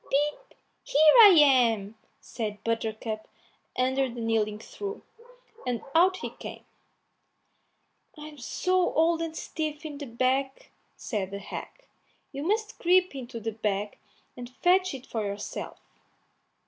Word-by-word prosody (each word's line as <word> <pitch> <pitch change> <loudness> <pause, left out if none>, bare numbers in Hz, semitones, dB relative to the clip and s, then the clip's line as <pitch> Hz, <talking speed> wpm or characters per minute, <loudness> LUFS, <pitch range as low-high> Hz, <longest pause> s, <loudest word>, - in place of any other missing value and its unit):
"Pip, 295 - 0
pip! - - -26 0.2
here 305 +1 +5
I 420 - +11
am," 235 -8 +4 0.2
said 210 -3 -6
Buttercup 220 -1 -3 0.5
under 260 +1 +1
the 240 0 -8
kneading 220 -2 0
trough, 405 - -7 0.6
and 245 -2 -2
out 365 +3 +5
he - - -6
came. - - -10 1.5
"I'm 300 -1 -10
so 365 - 0
old 330 +1 +3
and 325 -1 -4
stiff 310 0 -4
in 295 -2 -6
the 285 - -6
back," 260 +3 -1 0.2
said 200 -5 -3
the 200 - -5
hag, 350 - -9 0.5
"you 275 - -6
must 425 +6 -1
creep 365 0 +3
into 255 -3 -7
the 225 0 -3
bag 210 -1 -3 0.4
and 245 -1 -8
fetch 360 +5 +2
it 255 - -9
out - - -20
for 220 -2 -1
yourself." 200 0 -5
265 Hz, 135 wpm, -27 LUFS, 225-320 Hz, 1.5 s, I